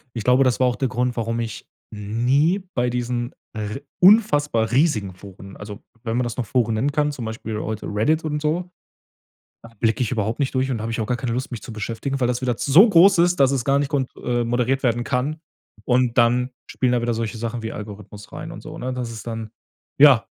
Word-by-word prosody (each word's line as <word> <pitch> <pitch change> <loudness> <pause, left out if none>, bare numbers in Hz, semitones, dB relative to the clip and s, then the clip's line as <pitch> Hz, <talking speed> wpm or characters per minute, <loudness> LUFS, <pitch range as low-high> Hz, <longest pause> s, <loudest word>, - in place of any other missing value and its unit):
Ich 115 - -4
glaube, 125 +2 +4
das 125 -2 +2
war 130 - +4
auch 125 - 0
der 135 - 0
Grund, 125 0 -1
warum 115 0 -2
ich 115 -1 -6 0.3
nie 125 - +1
bei 125 0 +1
diesen 120 0 -2 0.2
r 105 +3 -5 0.2
unfassbar 150 - +4
riesigen 125 - +1
Foren 95 0 -12
also, 105 +1 -9 0.2
wenn 115 0 -2
man 125 - +1
das 120 - -4
noch 125 - -3
Foren 115 0 +1
nennen 135 +7 0
kann, 150 0 +1
zum 125 -5 -6
Beispiel 110 -1 -5
heute 110 -1 -4
Reddit 150 +11 +1
und 150 -1 -2
so, 165 +4 -1 0.9
da 115 - -12
blicke 115 0 +1
ich 120 - 0
überhaupt 110 -1 -1
nicht 135 -1 -1
durch 130 +1 +1
und 115 -4 -2
habe 115 +1 -3
ich 115 - -3
auch 110 - -1
gar 125 +3 -1
keine 120 -2 -3
Lust, 130 +2 -3
mich 120 - -6
zu - - -9
beschäftigen, 115 +5 -4
weil 125 - +2
das 125 0 -1
wieder 125 -2 0
so 170 - +6
groß 190 0 +6
ist, 175 +1 +3
dass 135 -1 +5
es 130 -4 -1
gar 140 0 +3
nicht 140 -1 -1
kont 135 -3 -1
äh, 120 -1 -1
moderiert 125 +3 0
werden 120 -1 +1
kann. 140 +5 -2 0.5
Und 125 -1 +2
dann 125 +2 +3 0.2
spielen 125 -2 0
da 125 -1 +1
wieder 120 0 0
solche 115 0 -3
Sachen 115 +1 -4
wie 110 - -3
Algorithmus 105 -1 -9
rein - - -7
und - - -9
so, - - -9
ne? 130 +1 -4
Das 125 -2 -4
ist 110 -2 -9
dann 115 -2 -5 0.5
ja. 140 -6 +7
120 Hz, 230 wpm, -22 LUFS, 115-135 Hz, 0.9 s, ja